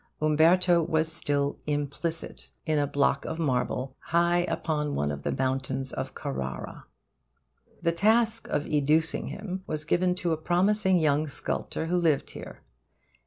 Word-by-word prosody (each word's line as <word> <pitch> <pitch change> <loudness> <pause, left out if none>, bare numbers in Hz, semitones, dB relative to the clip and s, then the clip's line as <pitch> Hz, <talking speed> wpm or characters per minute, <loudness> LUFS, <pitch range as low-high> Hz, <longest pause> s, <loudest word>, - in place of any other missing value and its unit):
Umberto 170 +3 +4
was 160 0 0
still 145 -3 -1
implicit 150 +3 -3 0.2
in 155 -2 +1
a 145 - +1
block 140 -1 +1
of 160 - -4
marble, 130 -3 -1
high 170 +1 +2
upon 150 -2 -1
one 75 0 0
of 70 -1 -5
the - - -1
mountains 130 0 -1
of - - -5
Carrara. 65 0 -5 1.0
The 170 - +3
task 225 +5 +2
of 150 0 -1
educing 155 +2 +1
him 190 -2 -5
was 155 -1 -3
given 180 +2 +2
to 175 -2 -1
a 160 - +1
promising 190 +4 +2
young 155 -1 +2
sculptor 150 +2 -3
who 175 +2 0
lived 160 -5 +1
here. - - -10
155 Hz, 145 wpm, -27 LUFS, 145-175 Hz, 1.0 s, Umberto